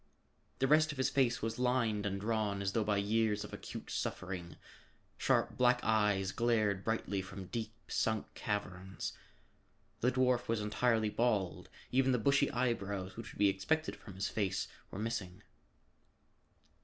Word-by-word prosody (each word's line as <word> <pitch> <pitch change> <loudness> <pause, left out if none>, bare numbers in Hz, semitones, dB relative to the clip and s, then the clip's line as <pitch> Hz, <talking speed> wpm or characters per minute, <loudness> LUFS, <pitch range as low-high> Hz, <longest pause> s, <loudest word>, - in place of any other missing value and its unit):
The 135 - +2
rest 155 +2 +5
of 145 - -8
his 130 - +1
face 125 -5 +2
was 115 +1 -2
lined 120 -5 +1
and 100 0 -2
drawn 105 -2 0
as 95 - 0
though 115 - +2
by 105 -1 +1
years 105 +1 +1
of - - -9
acute - - -7
suffering. 90 -2 -4 0.6
Sharp - - +1
black 125 0 +4
eyes 105 -3 +2
glared 110 -5 +1
brightly 110 -3 -1
from 95 0 -8
deep 110 +3 -4
sunk 110 -2 0
caverns. 95 -2 -3 0.9
The 125 - +3
dwarf 125 -1 +2
was 115 -1 +1
entirely 110 +1 +1
bald; 105 -7 0 0.2
even 130 +1 +3
the - - +3
bushy 135 +4 +3
eyebrows 100 -7 -1
which 115 0 -7
would - - -13
be 105 - +5
expected 155 +12 0
from 100 -5 -12
his 95 +2 -1
face, 100 -4 -1 0.2
were - - -7
missing. 105 -4 -3
110 Hz, 155 wpm, -34 LUFS, 100-120 Hz, 0.9 s, rest